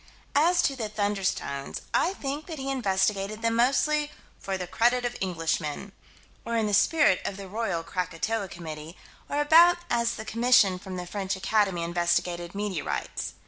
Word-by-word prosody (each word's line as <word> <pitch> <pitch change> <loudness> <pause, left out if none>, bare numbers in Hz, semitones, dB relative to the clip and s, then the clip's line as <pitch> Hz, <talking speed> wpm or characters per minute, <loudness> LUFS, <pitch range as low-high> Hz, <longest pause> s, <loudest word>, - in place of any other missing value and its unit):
As 335 +5 +4
to 275 - +1
the 225 -5 -4
"thunderstones," 200 -9 -2
I 365 - +2
think 285 0 -4
that 325 -3 -6
he 270 0 -3
investigated 205 -2 0
them 230 0 +2
mostly 295 +5 +2 0.3
"for 195 -1 -3
the 180 - -4
credit 245 +6 +2
of 245 0 -2
Englishmen," 165 0 -2 0.5
or 230 0 -2
in 225 - +1
the 210 - -1
spirit 245 - +4
of 195 - -4
the 195 -1 -8
Royal 200 -5 -2
Krakatoa 185 +4 -2
Committee, 160 -2 -8 0.3
or 290 - -1
about 335 +4 +6
as 235 0 +1
the 220 - -7
commission 230 -6 +4
from 185 0 -7
the 180 - -5
French 195 +1 -3
Academy 195 -2 +1
investigated 175 +1 -1
meteorites. 200 -6 -3
205 Hz, 160 wpm, -27 LUFS, 180-245 Hz, 0.5 s, about